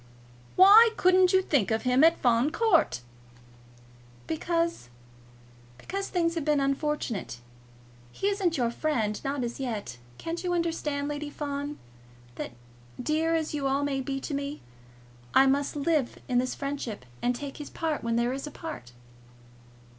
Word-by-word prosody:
"Why 415 Hz, +5 st, +9 dB
couldn't 370 Hz, 0 st, +5 dB
you 375 Hz, 0 st, +4 dB
think 280 Hz, -, +1 dB
of 220 Hz, 0 st, 0 dB
him 255 Hz, +2 st, +3 dB
at 330 Hz, -, +5 dB
Fawn 245 Hz, +3 st, +3 dB
Court?" 335 Hz, -, +2 dB, 1.2 s
"Because 335 Hz, -, -1 dB, 0.9 s
because 390 Hz, -, -4 dB
things 335 Hz, -2 st, +1 dB
have 330 Hz, -3 st, -2 dB
been 300 Hz, -1 st, +2 dB
unfortunate. 275 Hz, -, -2 dB, 0.7 s
He -, -, -5 dB
isn't 390 Hz, -5 st, +1 dB
your 240 Hz, -2 st, +1 dB
friend, 235 Hz, -7 st, -1 dB
not 275 Hz, -1 st, -2 dB
as 235 Hz, +2 st, -4 dB
yet. 215 Hz, -, -4 dB, 0.2 s
Can't 335 Hz, +2 st, -5 dB
you 355 Hz, -1 st, 0 dB
understand, 305 Hz, -4 st, -1 dB
Lady 295 Hz, 0 st, -4 dB
Fawn, 285 Hz, 0 st, -4 dB, 0.6 s
that, 120 Hz, -, -6 dB, 0.5 s
dear 315 Hz, +5 st, +1 dB
as 315 Hz, -2 st, -1 dB
you 285 Hz, -2 st, -1 dB
all 275 Hz, +1 st, +1 dB
must 270 Hz, -2 st, -1 dB
be 270 Hz, 0 st, -2 dB
to 295 Hz, -, -5 dB
me, 280 Hz, +1 st, -4 dB, 0.7 s
I 270 Hz, -, +7 dB
must 280 Hz, +2 st, +1 dB
live 295 Hz, -3 st, 0 dB
in 245 Hz, -1 st, +2 dB
his 255 Hz, 0 st, -1 dB
friendships, 275 Hz, -, -5 dB, 0.2 s
and 245 Hz, 0 st, +1 dB
take 280 Hz, +2 st, -7 dB
his 295 Hz, -, -7 dB
part 320 Hz, -2 st, -2 dB
when 230 Hz, 0 st, 0 dB
there 240 Hz, +2 st, +1 dB
is 275 Hz, +2 st, -5 dB
a -, -, -7 dB
part?" 300 Hz, -, -8 dB
285 Hz, 155 wpm, -28 LUFS, 255-330 Hz, 1.2 s, Why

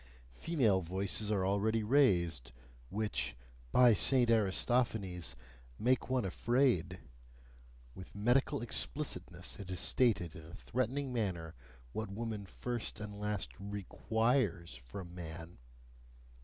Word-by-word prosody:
Female 115 Hz, -, +2 dB
voices 95 Hz, +4 st, -1 dB
are 100 Hz, -3 st, +1 dB
already 105 Hz, +3 st, +1 dB
raised, 85 Hz, -, +3 dB, 0.4 s
which, 105 Hz, -, -2 dB, 0.3 s
by 125 Hz, -, +7 dB
Saint 120 Hz, +3 st, +4 dB
Aristophanes! 105 Hz, -4 st, +1 dB, 0.4 s
make 130 Hz, +3 st, +1 dB
one 130 Hz, -4 st, +1 dB
afraid: 120 Hz, -, +1 dB, 0.9 s
with 95 Hz, -, -11 dB
medical 125 Hz, +6 st, +2 dB
explicitness 90 Hz, -10 st, -1 dB
it 100 Hz, -2 st, -8 dB
is 90 Hz, -2 st, -3 dB
stated 95 Hz, -10 st, +2 dB
in 80 Hz, -, -9 dB
a 80 Hz, +2 st, -11 dB
threatening 130 Hz, +2 st, -2 dB
manner 90 Hz, -8 st, -2 dB, 0.4 s
what 110 Hz, -1 st, -3 dB
woman 105 Hz, -1 st, -4 dB
first 120 Hz, +2 st, -3 dB
and 105 Hz, -1 st, -7 dB
last 105 Hz, -1 st, -2 dB
REQUIRES 105 Hz, -, 0 dB
from 85 Hz, +10 st, -9 dB
man. 85 Hz, -2 st, -8 dB
105 Hz, 110 wpm, -34 LUFS, 90-120 Hz, 0.9 s, by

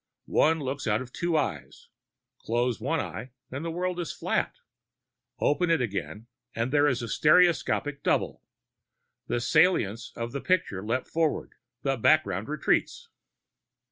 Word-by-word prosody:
One 160 Hz, +1 st, +3 dB
looks 135 Hz, -2 st, -4 dB
out 110 Hz, +3 st, +1 dB
of 130 Hz, -, -15 dB
two 170 Hz, -2 st, 0 dB
eyes. 75 Hz, -, -4 dB, 0.5 s
Close 120 Hz, 0 st, -1 dB
one 145 Hz, +7 st, 0 dB
eye 125 Hz, -3 st, -5 dB, 0.2 s
and 135 Hz, +4 st, -5 dB
the 165 Hz, -, -3 dB
world 180 Hz, +2 st, -2 dB
is 170 Hz, -, -3 dB
flat. -, -, -1 dB, 0.8 s
Open 170 Hz, +4 st, +2 dB
it 165 Hz, -2 st, +3 dB
again 105 Hz, -1 st, -4 dB, 0.3 s
and 115 Hz, +3 st, -1 dB
there 145 Hz, 0 st, +5 dB
is 130 Hz, -4 st, 0 dB
a -, -, -4 dB
stereoscopic 150 Hz, 0 st, +3 dB
double; -, -, 0 dB, 0.9 s
the 120 Hz, -, 0 dB
saliencies 120 Hz, -, +2 dB
of 115 Hz, 0 st, -4 dB
the 140 Hz, +1 st, -4 dB
picture 170 Hz, -, 0 dB
leap 115 Hz, +4 st, -1 dB
forward, 160 Hz, -2 st, -1 dB, 0.3 s
the 135 Hz, -1 st, 0 dB
background 115 Hz, -, +2 dB
retreats. 155 Hz, -, 0 dB
140 Hz, 140 wpm, -27 LUFS, 115-165 Hz, 0.9 s, there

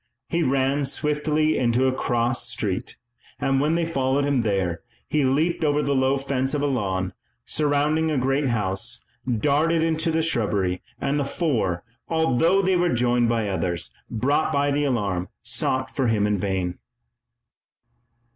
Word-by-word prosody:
He 170 Hz, -, 0 dB
ran 135 Hz, 0 st, +1 dB
swiftly 150 Hz, +2 st, +1 dB
into 120 Hz, +1 st, +2 dB
a 130 Hz, -, +2 dB
cross 120 Hz, -1 st, 0 dB
street, 100 Hz, -5 st, -3 dB, 0.4 s
and 135 Hz, 0 st, +1 dB
when 155 Hz, +3 st, +2 dB
they 170 Hz, 0 st, +1 dB
followed 135 Hz, -3 st, 0 dB
him 140 Hz, -3 st, +2 dB
there 95 Hz, -6 st, -1 dB, 0.3 s
he 150 Hz, -1 st, +1 dB
leaped 155 Hz, +6 st, +1 dB
over 150 Hz, -1 st, +2 dB
the 140 Hz, -, +1 dB
low 130 Hz, 0 st, +2 dB
fence 135 Hz, 0 st, -1 dB
of 145 Hz, -, -1 dB
a -, -, +2 dB
lawn, 95 Hz, -9 st, -1 dB, 0.3 s
surrounding 150 Hz, +2 st, +1 dB
a 150 Hz, -, 0 dB
great 135 Hz, +2 st, +1 dB
house, 95 Hz, -, -2 dB, 0.3 s
darted 150 Hz, +7 st, +2 dB
into 160 Hz, 0 st, 0 dB
the 160 Hz, 0 st, +1 dB
shrubbery, 100 Hz, -, 0 dB, 0.2 s
and 140 Hz, +1 st, 0 dB
the -, -, +1 dB
four, 130 Hz, -, -1 dB, 0.3 s
although 165 Hz, +4 st, +2 dB
they 190 Hz, 0 st, +2 dB
were 175 Hz, 0 st, +2 dB
joined 120 Hz, -2 st, +2 dB
by 115 Hz, -2 st, 0 dB
others, 90 Hz, -3 st, -2 dB, 0.2 s
brought 140 Hz, +7 st, +1 dB
by 145 Hz, 0 st, +1 dB
the 145 Hz, +1 st, +1 dB
alarm, 100 Hz, -9 st, -1 dB
sought 130 Hz, 0 st, -1 dB
for 135 Hz, -3 st, +1 dB
him 110 Hz, -3 st, +2 dB
in 105 Hz, -1 st, +1 dB
vain. 95 Hz, -2 st, -2 dB
135 Hz, 155 wpm, -24 LUFS, 115-150 Hz, 0.4 s, into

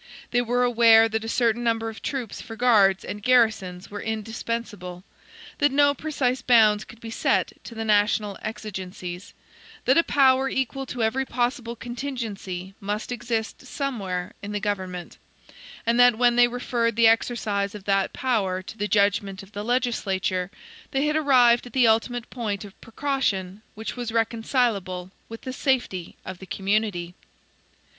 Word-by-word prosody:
They 245 Hz, -, +3 dB
were 245 Hz, +1 st, +1 dB
aware 230 Hz, -2 st, +6 dB
that 220 Hz, 0 st, -2 dB
a 225 Hz, -, -4 dB
certain 235 Hz, 0 st, +1 dB
number 225 Hz, -1 st, 0 dB
of 225 Hz, 0 st, -7 dB
troops 255 Hz, -6 st, -4 dB
for 225 Hz, -1 st, -9 dB
guards 210 Hz, -6 st, +4 dB
and 205 Hz, -, -6 dB
garrisons 215 Hz, -7 st, +2 dB
were 205 Hz, 0 st, -5 dB
indispensable; 220 Hz, -4 st, -4 dB, 0.6 s
that 290 Hz, -1 st, +3 dB
no 285 Hz, +1 st, +4 dB
precise 265 Hz, -4 st, -1 dB
bounds 220 Hz, -4 st, +5 dB
could 225 Hz, -, -14 dB
be 230 Hz, -1 st, -8 dB
set -, -, +1 dB
to 230 Hz, -, -9 dB
the 225 Hz, 0 st, -4 dB
national 210 Hz, -1 st, +2 dB
exigencies; 190 Hz, -4 st, -7 dB, 0.5 s
that 260 Hz, +6 st, +5 dB
a -, -, +4 dB
power 270 Hz, -2 st, +3 dB
equal 265 Hz, +1 st, -2 dB
to 245 Hz, -2 st, -3 dB
every 255 Hz, +5 st, +1 dB
possible 240 Hz, -1 st, -2 dB
contingency 225 Hz, -7 st, -5 dB
must 210 Hz, +4 st, -4 dB
exist 235 Hz, 0 st, -3 dB
somewhere 200 Hz, -11 st, -3 dB
in 205 Hz, +1 st, -6 dB
the 205 Hz, -, -1 dB
government: 185 Hz, -4 st, -4 dB, 0.7 s
and 235 Hz, +1 st, +2 dB
that 245 Hz, -2 st, +6 dB
when 240 Hz, 0 st, +4 dB
they 245 Hz, 0 st, +6 dB
referred 240 Hz, -2 st, -1 dB
the 230 Hz, 0 st, +4 dB
exercise 215 Hz, -3 st, +1 dB
of 205 Hz, -, -9 dB
that 195 Hz, -1 st, +1 dB
power 200 Hz, -8 st, -1 dB
to 220 Hz, +4 st, -10 dB
the 205 Hz, -, 0 dB
judgment 200 Hz, -2 st, +1 dB
of 195 Hz, -, -16 dB
the 205 Hz, 0 st, -5 dB
legislature, 200 Hz, -7 st, -1 dB, 0.4 s
they 275 Hz, +1 st, 0 dB
had 300 Hz, 0 st, +1 dB
arrived 250 Hz, -6 st, +4 dB
at -, -, -14 dB
the 255 Hz, -3 st, +4 dB
ultimate 230 Hz, +2 st, +1 dB
point 210 Hz, -5 st, -3 dB
of 200 Hz, -, -15 dB
precaution 220 Hz, -7 st, -2 dB
which 220 Hz, +1 st, -5 dB
was 240 Hz, -2 st, -4 dB
reconcilable 225 Hz, -5 st, 0 dB, 0.2 s
with 225 Hz, 0 st, -8 dB
the 260 Hz, -, -6 dB
safety 245 Hz, -10 st, -1 dB
of 185 Hz, -1 st, -7 dB
the 190 Hz, -, -11 dB
community. 195 Hz, -3 st, -1 dB
225 Hz, 160 wpm, -25 LUFS, 200-245 Hz, 0.7 s, aware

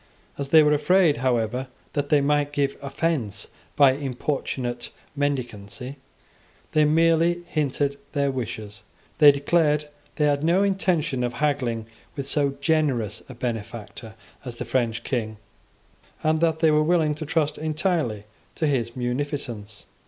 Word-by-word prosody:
As 140 Hz, -1 st, -5 dB
they 160 Hz, 0 st, +7 dB
were 150 Hz, 0 st, +4 dB
afraid, 155 Hz, +2 st, +3 dB
however, 125 Hz, 0 st, 0 dB, 0.3 s
that 145 Hz, -1 st, -1 dB
they 145 Hz, -1 st, +4 dB
might 145 Hz, 0 st, +1 dB
give 140 Hz, -1 st, 0 dB
offence 140 Hz, -, -2 dB, 0.3 s
by 140 Hz, -2 st, +6 dB
importunate 130 Hz, -2 st, -3 dB, 0.3 s
mendicancy, 125 Hz, -2 st, -3 dB, 0.7 s
they 155 Hz, -1 st, +4 dB
merely 165 Hz, +2 st, +3 dB
hinted 145 Hz, -3 st, -1 dB
their 140 Hz, -2 st, +1 dB
wishes. 110 Hz, -5 st, -6 dB, 0.4 s
They 150 Hz, -2 st, +10 dB
declared 150 Hz, +1 st, +2 dB
that 150 Hz, -1 st, -15 dB, 0.2 s
they 150 Hz, -, +2 dB
had 145 Hz, 0 st, +1 dB
no 175 Hz, +5 st, +3 dB
intention 170 Hz, -9 st, 0 dB
of 120 Hz, 0 st, -1 dB
haggling 125 Hz, -5 st, -1 dB, 0.3 s
with 140 Hz, -2 st, -4 dB
so 140 Hz, -2 st, +1 dB
generous 140 Hz, -, +1 dB
a 130 Hz, -, -9 dB
benefactor 115 Hz, -2 st, -6 dB, 0.3 s
as 125 Hz, -3 st, -6 dB
the -, -, -5 dB
French 120 Hz, -2 st, -1 dB
King, 110 Hz, -5 st, -2 dB, 0.9 s
and 155 Hz, 0 st, +2 dB
that 160 Hz, -1 st, +1 dB
they 160 Hz, -2 st, +5 dB
were 150 Hz, 0 st, +4 dB
willing 155 Hz, -1 st, +2 dB
to 155 Hz, +1 st, -6 dB
trust 150 Hz, -1 st, 0 dB
entirely 155 Hz, -, -1 dB, 0.3 s
to 160 Hz, -, -1 dB
his 120 Hz, -5 st, 0 dB
munificence. 125 Hz, -5 st, -4 dB
140 Hz, 140 wpm, -24 LUFS, 125-155 Hz, 0.9 s, They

